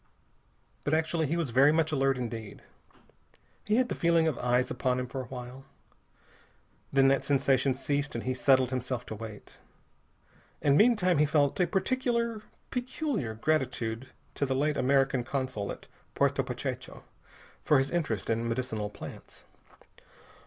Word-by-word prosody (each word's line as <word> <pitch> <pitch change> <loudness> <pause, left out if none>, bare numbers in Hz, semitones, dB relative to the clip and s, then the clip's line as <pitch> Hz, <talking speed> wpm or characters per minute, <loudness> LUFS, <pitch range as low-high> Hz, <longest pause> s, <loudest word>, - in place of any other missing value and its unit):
But 145 - +1
actually 160 0 0
he 165 +5 -1
was 160 -7 -1
very 135 +5 +6
much 160 0 +1
alert 135 -2 +2
indeed. 115 -4 -6 1.0
He 210 - +2
had 255 +1 +3
the - - -3
feeling 170 -1 +3
of 155 - 0
eyes 125 +1 +1
upon 125 0 0
him 125 - -2
for 130 +1 -5
a - - -7
while. 125 +1 -8 1.3
Then 135 0 +5
that 135 - +2
sensation 135 -1 +2
ceased 145 +1 -2
and 115 - -3
he 130 - -1
settled 130 0 +3
himself 125 -1 -3
to 110 - -6
wait. 110 -1 -10 1.0
And 140 -1 +3
meantime 185 -5 +4
he 150 - +5
felt 145 0 +2
a 180 - +3
particular, 235 +3 0 0.3
peculiar 250 - -2
gratitude 125 -3 -1 0.3
to 140 - -1
the 130 - 0
late 150 +2 +1
American 135 -1 +2
consul 130 -6 -3
at - - -9 0.3
Puerto - - +2
Pachecho - - -5 0.6
for 150 - +4
his 135 +1 0
interest 145 - -1
in 115 +1 -1
medicinal 115 -3 -2
plants. - - -11
135 Hz, 150 wpm, -29 LUFS, 125-160 Hz, 1.3 s, very